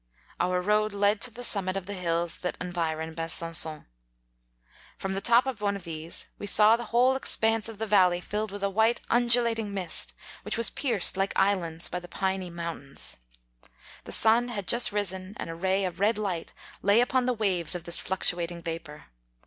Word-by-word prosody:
Our 180 +1 +1
road 210 +2 +1
led 205 +1 +1
to - - +1
the 240 +2 -10
summit 195 -4 +1
of 190 - -5
the 200 - -6
hills 170 -2 -1
that 180 - -4
environ 160 -3 -3
Besan£on. 165 -1 -2 1.1
From 190 0 -4
the 195 - -3
top 235 +4 +4
of 255 -5 -4
one 200 -1 0
of 200 - -8
these 165 0 -6
we 205 - -5
saw 210 +2 +7
the 240 0 -6
whole 250 +3 +3
expanse 225 -4 0
of 225 - -9
the 220 - -3
valley 185 -4 +4
filled 210 +3 -4
witti 205 0 -7
a 200 - +1
white 220 +4 +2
undulating 235 -2 +2
mist, 185 -3 +1 0.3
which - - -3
was 230 - +3
pierced 225 -9 +2
like 195 0 0
islands 175 -4 0
by 180 - -4
the 175 - -12
piny 190 0 -2
moun 170 -2 -5
tains. - - -2 0.9
The - - -8
sun 230 +2 +3
had 205 -6 -5
just 235 -1 +4
risen, 190 -1 -1
and - - -5
a - - -7
ray 190 +3 0
of 180 -1 -5
red 210 +2 +2
light 190 -6 -3 0.3
lay 200 +3 +4
upon 250 +1 +1
the 250 - +2
waves 185 -7 0
of 175 - -4
85 - - -24
this 170 - +1
fluctuating 175 -2 +1
vapour. 165 -3 -7
195 Hz, 195 wpm, -27 LUFS, 175-220 Hz, 1.1 s, saw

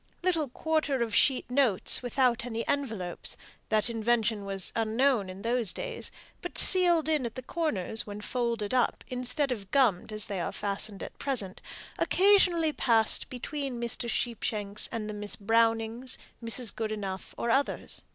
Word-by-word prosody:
Little 330 -6 +1
quarter 300 -2 0
of 225 - -5
sheet 265 -3 +3
notes, 250 -8 +5
without 245 -1 +1
any 230 -1 -4
envelopes 220 -12 -3 0.3
that 215 0 +2
invention 225 -2 0
was 195 -2 0
unknown 225 -1 +1
in 185 +1 -9
those 235 -4 0
days - - -5 0.3
but 355 - -7
sealed 350 -4 +6
in 310 -2 +2
the 255 - -7
corners 240 - -1
when 205 0 -7
folded 235 -1 -2
up 250 -1 +1
instead 255 +3 -1
of 200 -6 -5
gummed 225 -7 +2
as 215 0 -1
they 195 -3 -4
are - - -3
fastened 200 0 -4
at - - -10
present 225 -9 +1 0.4
occasionally 360 -5 +3
passed 225 -6 +2
between 265 0 -5
Mr. 235 0 -1
Sheepshanks 215 -4 0
and 220 -2 -4
the 210 - -5
Miss 210 0 -3
Brownings, 225 +3 +1 0.3
Mrs. 230 0 0
Goodenough 210 -4 -5
or 235 - -1
others. 275 +3 -1
235 Hz, 150 wpm, -28 LUFS, 210-270 Hz, 0.4 s, sealed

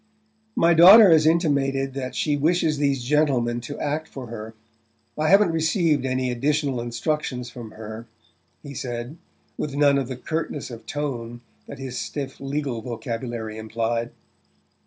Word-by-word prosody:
"My 170 +1 +4
daughter 190 +4 +9
has 155 -1 +5
intimated 140 -5 +1
that 130 -2 -5
she 150 -2 +1
wishes 155 0 +1
these 140 -3 +1
gentlemen 125 -4 +1
to 145 +4 -7
act 150 +2 -2
for 130 -2 -8
her. 110 -1 -8 0.6
I 155 0 0
haven't 195 0 +5
received 160 - +1
any 130 -1 -1
additional 140 0 0
instructions 125 +1 -3
from 120 -3 -9
her," 110 +1 -9 0.6
he 140 -2 -8
said, 120 +3 -5 0.4
with 145 -2 -3
none 140 -1 +4
of 135 - -3
the 130 -1 -6
curtness 155 -1 -4
of 115 -1 -10
tone 120 -5 -4 0.3
that - - -8
his 130 -2 -5
stiff 135 -2 -5
legal 135 -3 -3
vocabulary 115 -2 -5
implied. 115 +1 -2
135 Hz, 145 wpm, -24 LUFS, 120-150 Hz, 0.6 s, daughter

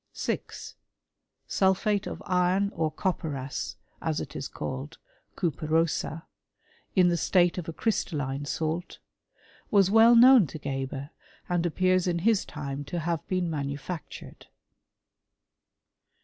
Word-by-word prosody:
6. - - -5 0.7
Sulphate 195 +2 +1
of - - -7
iron 185 +2 +2
or 160 -1 0
copperas, 150 -7 -3 0.3
as - - -1
it - - -7
is - - -4
called 65 +2 -6 0.4
(cuperosa), 160 0 0 0.7
in 180 -2 +5
the 170 - +1
state 175 +1 +2
of 165 - -6
a - - -5
crystalline 145 - -1
salt, 160 +4 -3 0.7
was 195 -2 +4
well 225 +2 +7
known 245 - +8
to 155 - -8
Geber, 135 0 -4 0.4
and 175 -1 +1
appears 185 +2 +2
in 175 -1 +1
his 225 -3 +3
time 145 -2 -5
to 155 +5 -5
have 165 -1 -2
been.^ 185 -2 0
manufactured. 145 +2 -6
170 Hz, 120 wpm, -27 LUFS, 150-185 Hz, 0.7 s, known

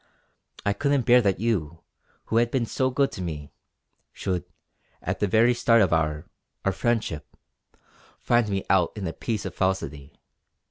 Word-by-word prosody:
I 100 - +2
couldn't 140 +3 +1
bear 125 0 +6
that 100 -5 +1
you, 85 -8 -1 0.4
who 110 - 0
had 120 0 +3
been 125 -1 0
so 130 +3 0
good 135 +1 +1
to - - -7
me, 75 -5 -6 0.6
should, 90 -3 -3 0.5
at - - -3
the 105 - +1
very 115 +5 +4
start 115 -1 +4
of 90 - +1
our 75 -2 0 0.4
our 95 - +3
friendship, 110 -7 -2 0.8
find 120 -2 +2
me 95 -1 -2
out 95 -3 +3
in 100 -3 -5
a 80 - -3
piece 110 -4 -3
of 95 - -4
falsity. 75 -8 -2
100 Hz, 165 wpm, -25 LUFS, 85-120 Hz, 0.8 s, bear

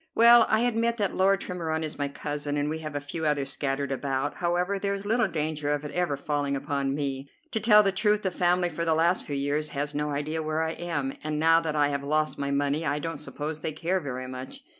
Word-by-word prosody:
"Well; 235 0 +7
I 220 +1 +3
admit 235 -1 +1
that 205 -3 0
Lord 195 +1 +3
Tremorne 160 -3 -3
is 155 -1 -5
my 145 - 0
cousin, 145 +1 -4
and 145 0 0
we 160 +1 -3
have 155 -2 -6
a - - 0
few 145 +3 -6
others 140 -2 +2
scattered 140 -1 -1
about. 135 +1 -2
However, 180 +3 0
there's 200 0 -2
little 225 +1 +2
danger 155 -3 -2
of 150 0 -1
it 145 - -5
ever 175 -3 0
falling 145 0 -1
upon 140 -1 -1
me. 140 -1 -3 0.2
To 220 - 0
tell 210 -1 +6
the 195 - +2
truth, 210 +2 +1
the 190 - 0
family 175 0 +2
for 170 +1 -3
the 165 -1 +2
last 170 +3 +2
few 145 - -3
years 145 +2 -1
has 145 +1 -1
no 150 +1 -1
idea 150 +2 -2
where 155 +1 -1
I 160 - -1
am, 160 -6 -3
and 155 0 -2
now 165 +1 +5
that 160 -2 -3
I 145 -1 +3
have 140 -1 -2
lost 155 +2 0
my 140 0 -1
money 140 +2 0
I 145 -1 0
don't 165 0 -4
suppose 150 +1 -5
they 155 - -3
care 180 +5 0
very 130 -5 -5
much. 130 - -8
155 Hz, 240 wpm, -27 LUFS, 145-175 Hz, 0.2 s, Well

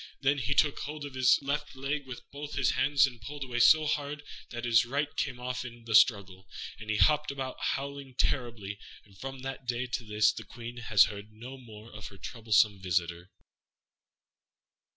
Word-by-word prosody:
Then 140 +1 +2
he 130 +4 0
took 145 -2 +3
hold 150 0 -5
of 140 - -8
his 130 -1 +5
left 140 0 -2
leg 140 +1 -3
with 125 -1 -9
both 145 +1 -7
his 135 -2 +2
hands, 140 +2 +4
and 125 -4 -7
pulled 145 +5 -6
away 125 -2 -3
so 155 +5 +7
hard 145 0 -2 0.3
that 120 0 -5
his 115 -2 +5
right 140 +4 -2
came 130 -4 -2
off 125 +1 -3
in 120 -2 -10
the 115 - -3
struggle, 95 -4 +4 0.3
and 110 -1 -9
he 110 - +1
hopped 150 +10 +4
away 135 -2 -4
howling 140 -1 -3
terribly. 115 -8 -1 0.3
And 100 -2 -20
from 135 +5 -7
that 135 -1 -6
day 125 +1 -1
to 120 -1 -3
this 105 -1 +3
the - - -7
Queen 120 0 -9
has 115 -4 +5
heard 105 0 -5
no 120 +5 -9
more 115 -3 -13
of 105 -1 -8
her 100 - -13
troublesome 105 -1 +2
visitor. 85 -1 -1
125 Hz, 190 wpm, -30 LUFS, 110-140 Hz, 0.3 s, so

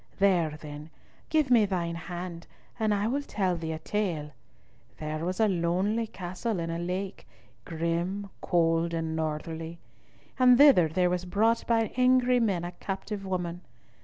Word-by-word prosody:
There, 175 -6 +2
then, 150 0 -9 0.4
give 305 -5 +2
me 230 -4 +6
thine 175 -3 -1
hand, 175 0 -6 0.3
and 220 -1 +1
I 205 0 +1
will 275 +5 0
tell 190 -10 -1
thee 160 -1 -4
a - - -4
tale. 165 -4 -2 0.7
There 155 +1 -4
was 185 +4 -2
a 220 - +5
lonely 190 +5 0
castle 185 +2 -4
in 165 0 -3
a 165 - -3
lake, 185 +3 -4 0.4
grim, 170 +5 -2
cold, 165 -1 +2
and 160 -1 -2
northerly; 160 +1 -4 0.6
and 250 -1 +7
thither 275 - +7
there 180 +3 +1
was 180 0 -1
brought 220 +5 +1
by 225 -2 +2
angry 250 0 +4
men 195 -7 +1
a 175 - -4
captive 195 +2 -5
woman. 175 -2 -3
180 Hz, 155 wpm, -28 LUFS, 165-210 Hz, 0.7 s, and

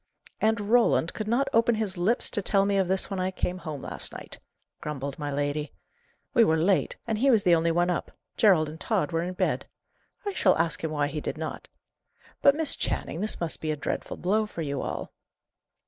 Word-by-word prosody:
"And 220 0 +2
Roland 235 -8 +4
could 215 - -4
not 245 +5 +2
open 230 +1 +4
his 215 -3 -2
lips 195 +7 +1
to 205 - -1
tell 195 +1 +2
me 200 0 +1
of 190 -2 +2
this 190 +2 0
when 195 - -2
I 185 0 0
came 185 -1 -2
home 150 -4 -6
last - - -3
night!" - - -8 0.4
grumbled 140 -1 -5
my 145 -1 -3
lady. 145 +1 -2 0.6
"We 235 - +6
were 160 -6 +3
late, 180 +4 +2
and 220 -2 -1
he 275 +3 +4
was 225 -6 +4
the 175 - +5
only 165 0 +3
one 175 +2 +2
up; 170 - -2 0.3
Gerald 180 -8 +4
and 155 +2 -8
Tod 210 -5 0
were 165 0 0
in 180 +2 -4
bed. - - 0 0.6
I 405 - -2
shall 185 - +3
ask 165 -2 0
him 160 - 0
why 150 -2 0
he 145 +1 -4
did - - -4
not. 155 0 -5 0.7
But, 280 - +6
Miss 315 -2 +2
Channing, 165 - -2
this 215 - 0
must 170 -2 -1
be 155 - -2
a 155 - +1
dreadful 145 - -4
blow 210 +4 +1
for 170 -5 -5
you 140 -2 -2
all?" - - -5
180 Hz, 215 wpm, -27 LUFS, 155-215 Hz, 0.7 s, We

